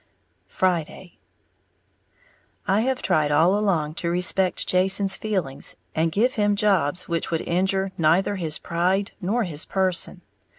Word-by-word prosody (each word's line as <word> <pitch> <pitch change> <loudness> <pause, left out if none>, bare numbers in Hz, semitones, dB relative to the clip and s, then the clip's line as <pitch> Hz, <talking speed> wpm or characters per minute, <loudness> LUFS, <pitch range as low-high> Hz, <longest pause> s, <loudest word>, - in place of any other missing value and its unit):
Friday. 180 0 -2 1.5
I 195 +3 +2
have 260 +2 -1
tried 155 -5 +1
all 165 +6 +4
along 175 -8 0
to 170 - -1
respect 180 +1 +1
Jason's 190 +1 +2
feelings, 175 -11 -3 0.2
and 160 +1 0
give 235 +8 +1
him 205 -1 +1
jobs 185 -6 +1
which 170 -1 -1
would 165 -1 -1
injure 190 +2 0
neither 170 +5 +2
his 160 -4 -1
pride 185 +4 -1
nor 215 +6 0
his 160 -6 -2
person. 190 -2 -2
185 Hz, 130 wpm, -23 LUFS, 165-195 Hz, 1.5 s, all